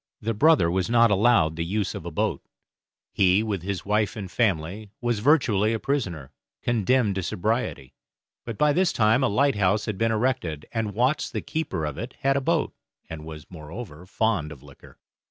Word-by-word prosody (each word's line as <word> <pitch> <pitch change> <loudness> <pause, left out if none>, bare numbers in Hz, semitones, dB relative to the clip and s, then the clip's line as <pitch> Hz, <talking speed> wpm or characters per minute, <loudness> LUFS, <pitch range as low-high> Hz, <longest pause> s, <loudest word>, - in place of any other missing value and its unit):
The 115 +2 -2
brother 140 - +4
was 95 +3 -1
not 115 -1 +5
allowed 100 -6 +3
the 85 - -1
use 100 +3 -2
of 85 - -7
a - - -2
boat; 80 - -1 0.7
he, 95 +2 +3
with 105 -5 -2
his 95 +1 -4
wife 105 +1 0
and 100 -4 -7
family, 100 -1 -1
was 120 -3 -1
virtually 115 -5 +3
a 110 - -2
prisoner, 95 - -3 0.3
condemned 120 -1 +2
to 95 - -2
sobriety. 105 - -2 0.5
But 115 -3 -6
by 150 -1 +3
this 185 +2 +2
time 110 +4 +3
a - - +4
lighthouse 105 -5 +2
had 105 -3 -4
been 115 0 +2
erected, 110 - -1
and 110 -3 -3
Watts 125 +6 +1
the - - -4
keeper 155 - -3
of 75 -2 -5
it 120 +3 -6
had 135 0 +2
a 140 - +1
boat, - - 0 0.4
and 80 -1 -7
was, 80 -1 -9
moreover, 85 +1 -9
fond 100 -7 0
of 70 -4 -12
liquor. 70 -1 -16
105 Hz, 185 wpm, -25 LUFS, 90-120 Hz, 0.7 s, not